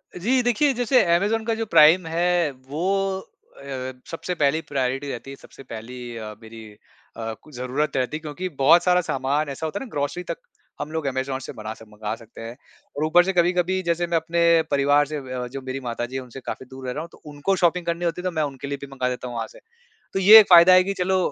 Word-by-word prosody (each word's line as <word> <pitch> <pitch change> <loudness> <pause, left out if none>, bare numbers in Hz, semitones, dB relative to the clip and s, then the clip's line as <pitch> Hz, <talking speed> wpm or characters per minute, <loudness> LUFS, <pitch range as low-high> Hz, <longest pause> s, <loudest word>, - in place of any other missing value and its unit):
जी, 245 +8 +1
देखिए 260 +4 +2
जैसे 245 -1 +3
अमेज़न 215 +5 0
का 230 - 0
जो 225 - -3
प्राइम 165 -2 +6
है 170 -1 +1 0.2
वो 150 +4 -3 0.4
अ, 135 -7 -9 0.2
सबसे 170 +2 -4
पहली 150 +1 +1
प्रायोरिटी 135 0 -2
रहती 120 +3 -7
है - - -8
सबसे - - -14
पहली 120 +1 -8
अ, 110 -1 -7
मेरी 110 0 -11 0.5
अ, 115 -1 -4
कु 155 - -17
ज़रूरत 135 +2 -2
रहती 130 +4 -1
है - - -10
क्योंकि 160 +4 -5
बहुत 165 +5 +6
सारा 180 0 +3
सामान 140 0 -1
ऐसा 140 +4 -5
होता 160 +6 -3
है 270 - -6
ना - - -12
ग्रोसरी 145 +5 -3
तक - - -5 0.4
हम 150 - -5
लोग 160 -2 -3
अमेज़न 130 0 -2
से 135 - -8
बना 110 0 -6
सक 110 0 -15
मँगा 105 0 -5
सकते 115 0 -14
हैं 115 +1 -7 0.4
और 150 - 0
ऊपर 175 +3 +5
से 190 - 0
कभी-कभी 180 +1 +2
जैसे 170 0 0
मैं 170 -1 +1
अपने 165 +1 -1 0.3
परिवार 145 +1 +3
से 150 +1 -4
वे 130 -2 -8
अ, 125 -1 -3
जो 135 +2 -7
मेरी 130 +1 -5
माताजी 120 +2 -4
हैं, 130 - -3
उनसे 125 +1 -10
काफ़ी 130 - -7
दूर 130 0 -10
रह 125 - -2
रहा 150 - -4
हूँ 165 - -8
तो - - -19
उनको 150 +7 0
शॉपिंग 175 -1 +1
करनी 170 +1 -2
होती 170 +1 -2
है - - -15
तो 185 - 0
मैं 155 -2 -1
उनके 140 -1 -5
लिए 140 - -3
भी 140 - -7
मँगा 130 -2 -1
देता 125 0 -5
हूँ 120 - -7
वहाँ - - -3
से। - - -15 0.5
तो - - -1
ये 210 +4 +10
एक 210 - +3
फ़ायदा 175 0 +8
है 185 0 +7
कि 195 +1 -2
चलो, 185 +1 +1
150 Hz, 245 wpm, -23 LUFS, 130-180 Hz, 0.5 s, ये